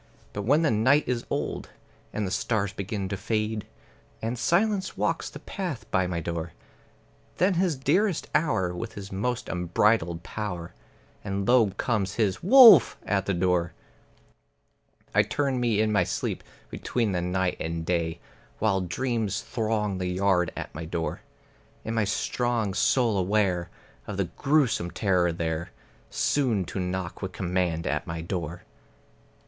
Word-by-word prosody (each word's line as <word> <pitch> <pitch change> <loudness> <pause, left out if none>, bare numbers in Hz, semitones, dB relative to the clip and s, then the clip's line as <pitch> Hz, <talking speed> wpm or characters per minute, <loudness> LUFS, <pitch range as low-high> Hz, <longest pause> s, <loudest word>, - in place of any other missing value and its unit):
But 100 - -3
when 145 +7 +4
the 155 - +3
night 130 +8 +4
is 120 -2 -2
old, - - -3 0.4
and 110 - -2
the 95 - -3
stars 100 +1 0
begin 100 0 -3
to 100 - -2
fade, 110 0 -2 0.5
And 115 +2 -2
silence 190 - +1
walks - - -1
the - - -9
path 175 - -5
by 95 -1 +2
my 85 -2 -2
door, 85 0 -4 0.8
Then 185 +2 +3
is 170 - 0
his 180 -5 +1
dearest 175 +7 +1
hour, 150 - +1
his 100 -3 -9
most 120 +5 -2
unbridled 90 -1 +1
power, 90 -5 -5 0.5
And 100 -1 -2
low 120 -4 +5
comes 105 -6 -1
his 105 -5 0
"Wolf!" 220 - +8
at 100 -1 0
the 100 - +1
door. 90 -1 +1 1.4
I - - +6
turn 135 -3 -1
me 115 -4 +1
in 110 0 +1
my 105 - +3
sleep - - -3 0.3
between 115 -4 -1
the 90 -2 -1
night 90 +1 0
and 80 0 -3
day, 85 -1 -1 0.4
While 100 -3 +1
dreams 110 +2 -1
throng 110 -4 -1
the 90 - -2
yard 90 -2 +2
at - - -6
my 80 +2 -6
door. 80 0 -3 0.6
In 110 - -2
my 110 -2 +1
strong 115 +1 -1
soul 115 -1 +2
aware 90 -2 +1 0.4
of 100 -2 -5
a - - +3
grewsome 125 - +1
terror 90 -3 +1
there 80 0 -3 0.4
Soon 120 -10 +1
to 95 - -5
knock 90 -1 -3
with 95 -2 -4
command 90 -2 -1
at - - -1
my 85 0 -4
door. 85 -1 -4
100 Hz, 150 wpm, -27 LUFS, 90-120 Hz, 1.4 s, Wolf